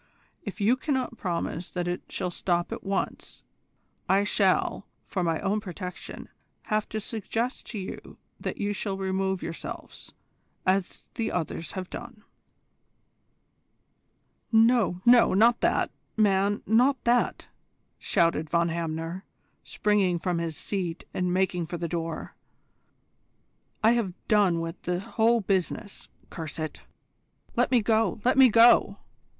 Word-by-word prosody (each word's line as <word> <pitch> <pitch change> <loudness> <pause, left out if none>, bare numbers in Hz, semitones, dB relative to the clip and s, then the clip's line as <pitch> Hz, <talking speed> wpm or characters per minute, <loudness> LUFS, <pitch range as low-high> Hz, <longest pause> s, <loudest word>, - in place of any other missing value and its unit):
If 205 - -7
you 220 +5 +3
cannot 260 -4 -2
promise 175 -1 -3
that 175 -1 -3
it 175 0 -2
shall 180 -2 -3
stop 175 0 -1
at - - -5
once 195 0 -3 0.7
I 195 +2 +4
shall, 200 -1 +1 0.2
for 185 - -2
my 165 -2 0
own 205 +2 0
protection, 180 -2 -7 0.4
have 215 -1 -1
to 215 - -3
suggest 225 +3 -3
to 225 - -5
you 190 -2 -7 0.2
that - - -4
you 205 0 -1
shall 200 -1 -3
remove 190 0 -1
yourselves, 165 - -7 0.5
as 185 0 0
the 225 - -2
others 165 -1 -3
have 185 -2 -5
done." 240 -3 -9 2.3
"No, 225 -5 +4
no, 240 -4 +6
not 230 +4 +4
that, - - +2 0.3
man, 205 -1 +2
not 250 +6 +4
that!" 240 +1 +1 0.5
shouted 165 -2 +1
Von 170 0 +2
Hamner, 165 +2 -3 0.4
springing 200 -4 +1
from 175 0 -1
his 165 -2 -3
seat 180 -4 -3
and 180 -1 0
making 180 -2 0
for 175 - -4
the 170 0 -3
door. 165 -1 -4 1.5
"I 220 - +6
have 225 -7 0
done 200 -6 +3
with 165 +1 -6
the 180 0 -1
whole 230 +4 +2
business, 195 +1 -2 0.2
curse 160 -4 -5
it! 155 -1 -5 0.7
Let - - +2
me 245 -3 +4
go, 220 -3 +2
let 255 - +4
me 265 -2 +8
go! 230 -2 +6
195 Hz, 135 wpm, -27 LUFS, 175-220 Hz, 2.3 s, me